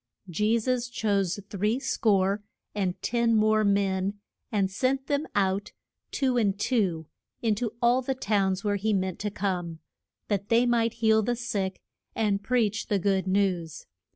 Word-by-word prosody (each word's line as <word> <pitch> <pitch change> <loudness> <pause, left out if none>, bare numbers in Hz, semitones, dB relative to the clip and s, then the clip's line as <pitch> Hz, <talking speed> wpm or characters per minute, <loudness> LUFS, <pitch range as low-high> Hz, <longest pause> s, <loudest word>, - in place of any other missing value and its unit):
Je 210 +6 +1
sus 245 +1 -1
chose 200 -5 0
three 210 +5 0
score 200 -5 +1 0.3
and 190 -3 -2
ten 235 -1 +2
more 215 0 +3
men 200 -1 +1 0.3
and 195 -3 +1
sent 265 +6 0
them 290 +2 -1
out, 195 +1 0 0.4
two 260 -3 0
and 205 -4 +1
two, 190 -9 0 0.4
in 225 -2 +3
to 220 +1 -3
all 245 +2 +4
the 265 +1 -2
towns 200 -5 0
where 205 -1 +1
he 215 +2 0
meant 190 -2 -1
to 210 - -2
come, 180 -5 -3 0.5
that 200 -1 -2
they 235 +1 +4
might 230 -1 +2
heal 220 0 +5
the 240 +3 0
sick 200 -5 -3 0.4
and 205 -3 +1
preach 225 -2 0
the 205 - +1
good 190 0 0
news. 185 -4 0
205 Hz, 155 wpm, -27 LUFS, 195-230 Hz, 0.5 s, heal